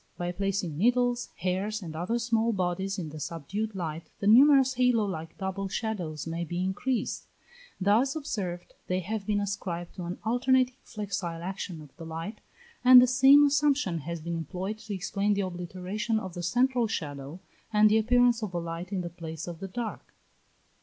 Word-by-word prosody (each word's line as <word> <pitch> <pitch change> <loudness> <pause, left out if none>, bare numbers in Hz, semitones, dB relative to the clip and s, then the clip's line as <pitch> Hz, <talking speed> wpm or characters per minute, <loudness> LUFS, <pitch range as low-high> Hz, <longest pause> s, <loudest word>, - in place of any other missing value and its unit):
By 175 0 -2
placing 185 -4 -2
needles, 245 +2 +2
hairs, 190 +4 -2
and 160 -3 -7
other 180 +9 -1
small 230 -1 +1
bodies, 190 +1 -1
in 170 -5 -4
the 155 +1 -8
subdued 195 +8 -4
light, 165 -3 -5
the - - -4
numerous 265 +4 +7
halo 250 -3 +3
like 165 -4 -6
double 195 0 -3
shadows 185 - -3
may 165 +1 -3
be 175 +2 -3
increased; 225 +6 -2 0.5
thus 220 +9 +3
observed, 195 - -4
they 185 0 0
have 205 +2 -4
been 210 -1 +2
ascribed 185 -4 -4
to 180 - -4
an 175 +1 -4
alternating 255 +2 +3
flexile 180 -5 -4
action 185 -3 -5
of 150 -3 -15
the 165 - -8
light, 165 +7 -6 0.4
and 255 0 +10
the 250 - +7
same 270 +3 +7
assumption 285 - +2
has 170 +3 -5
been 170 +2 -4
employed 185 +6 -4
to 215 -2 -5
explain 195 +2 0
the 200 - 0
obliteration 185 +4 -3
of 190 -5 -5
the 175 - -5
central 245 +6 +2
shadow, 145 -3 -5 0.3
and 215 0 +6
the 220 - +5
appearance 245 +1 +3
of 200 -5 -4
a - - +1
light 170 +2 -5
in 190 -2 -1
the 175 - -4
place 160 -2 -7
of 170 -2 -7
the 195 - -5
dark. 225 +3 -6
195 Hz, 180 wpm, -28 LUFS, 175-230 Hz, 0.5 s, and